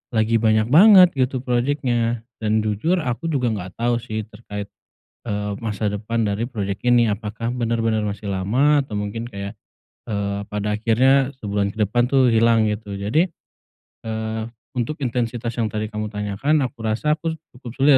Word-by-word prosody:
lagi 110 +1 +3
banyak 110 0 +3
banget 185 +1 +8
gitu, 130 0 0
projeknya. 120 -2 0 0.2
Dan 110 0 +1
jujur 135 - 0
aku 125 +6 -2
juga 130 -7 0
enggak 95 -3 -5
tau 120 0 +1
sih 110 -2 -4
terkait, 105 -2 -8 0.6
eee, 105 -1 -2
masa 105 -2 -2
depan 110 +3 -2
dari 105 +3 -1
projek 100 -5 -3
ini. 120 -2 +5
Apakah 110 +3 -3
bener-bener 115 -3 0
masih 100 0 -4
lama, 125 +11 +3
atau 105 - -7
mungkin 105 +3 -3
kayak, 100 -1 -7 0.5
eee, 100 -1 -2
pada 105 0 -1
akhirnya 130 +5 +3
sebulan 100 -1 -1
ke 110 - -15
depan 120 +3 +2
tuh, 130 -2 +4
hilang, 115 -1 +4
gitu. 105 -1 -4
Jadi, 115 - +2 0.8
eee, 110 0 -3 0.3
untuk 145 +5 -2
intensitas 120 -1 -1
yang 115 - +2
tadi 110 0 -3
kamu 105 0 -3
tanyakan, 105 +9 0
aku 125 -2 -5
rasa 150 +8 +1
aku 165 -1 -2 0.2
cukup 120 -2 -9
sulit 140 +2 +4
115 Hz, 160 wpm, -22 LUFS, 105-125 Hz, 0.8 s, banget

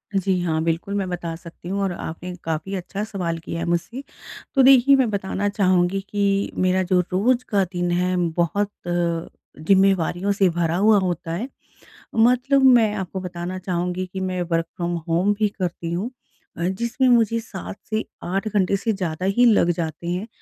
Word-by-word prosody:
जी 190 -1 +1
हाँ। 160 -2 0
बिल्कुल 165 +4 -1
मैं 195 -2 -1
बता 170 -2 -4
सकती 170 +1 -11
हूँ 200 +1 -1
और 195 - 0
आपने 175 +2 -6
काफ़ी 165 +4 -3
अच्छा 195 +3 -4
सवाल 180 -6 -3
किया 165 +1 -5
है 170 - -2
मुझसे 175 +10 -2 0.5
तो 270 - +6
देखिए 270 +1 +7
मैं 260 -4 +2
बताना 200 0 -2
चाहूँगी 185 -1 +2
कि 200 -1 0
मेरा 185 0 +2
जो 185 0 +2
रोज़ 240 +7 +2
का 200 -2 +3
दिन 175 0 -1
है 180 +1 +1
बहुत, 175 +5 0 0.2
ज़िम्मेवारियों 175 +2 0
से 195 -2 +3
भरा 170 -1 0
हुआ 210 +2 +5
होता 175 -3 -2
है। 215 +10 -3 0.7
मतलब 250 +4 +3
मैं 235 -5 +5
आपको 190 -1 -4
बताना 180 0 -5
चाहूँगी 180 0 -2
कि 190 - -4
मैं 185 -1 -2
वर्क़ 165 0 +1
फ्रॉम 175 0 -2
होम 180 +5 +2
भी 210 -1 +2
करती 170 -2 -3
हूँ 200 +8 -2 0.5
अ, - - -3
जिसमें 235 +7 0
मुझे 230 -2 +4
7 200 -3 -8
से 215 0 0 0.2
8 195 +4 -2
घंटे 200 -1 +1
से 220 +3 -1
ज़्यादा 185 -3 -3
ही 245 - +5
लग 210 -7 +4
जाते 165 -1 -3
हैं 180 +5 -2
185 Hz, 175 wpm, -22 LUFS, 175-205 Hz, 0.7 s, देखिए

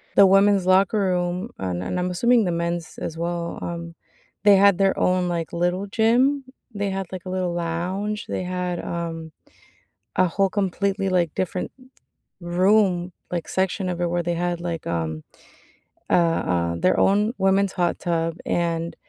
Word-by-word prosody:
The 200 - +8
women's 195 0 +4
locker 190 +3 +4
room, 180 +2 -1
uh - - -4
and 90 - -2
I'm 180 0 -1
assuming 235 +4 +3
the 175 - 0
men's 170 0 -3
as 165 - -5
well, 170 0 -3
um, 170 -1 -6 0.5
they 205 - +8
had 200 -2 +5
their 195 0 +2
own, 180 0 +2
like, 170 -2 -3
little 175 +3 -1
gym. 250 +6 +2 0.3
They 205 -1 -2
had, 190 -1 -3
like, 185 0 -6
a - - -5
little 185 -2 -1
lounge. 180 +5 -3
They - - -3
had, 180 -1 -3
um, 165 -2 -5 0.9
a 185 - +4
whole 195 +3 +1
completely, 195 0 -1
like, 175 -4 +1
different 185 0 -2 0.7
room, 180 0 +2 0.2
like, 175 -2 -3
section 190 0 -1
of 175 -1 -4
it 175 - +1
where 175 0 0
they 175 0 -1
had, 175 0 -2
like, 170 -2 -4
um, 80 -2 -2 0.9
uh - - 0 0.4
uh, 85 -1 0
their 185 - +2
own 210 +4 +3
women's 195 0 +2
hot 175 -2 0
tub, 165 -1 -1
and 170 -1 -1
180 Hz, 165 wpm, -23 LUFS, 170-195 Hz, 0.9 s, The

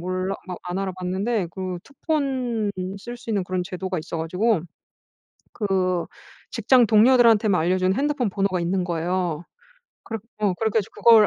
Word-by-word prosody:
몰라 185 +2 -2
막 180 - -4
안 180 +1 -3
알아봤는데 190 +2 -1
그 185 -1 -4
투폰 265 -7 -1 0.3
쓸 240 +4 -7
수 235 - -16
있는 200 -4 0
그런 185 0 -1
제도가 185 0 -4
있어 160 +2 -5
가지고 180 +4 +1 0.9
그 185 -4 0 0.5
직장 250 -3 +4
동료들한테만 220 -2 +5
알려준 185 +3 +2
핸드폰 280 -5 0
번호가 195 -1 0
있는 180 +2 0
거예요. 175 -1 -1 0.6
그렇 225 -1 -4 0.2
어 205 -3 +2
그래 220 +3 0
가지고 215 -2 -2
그걸 225 -3 +8
190 Hz, 315 characters per minute, -24 LUFS, 180-225 Hz, 0.9 s, 그걸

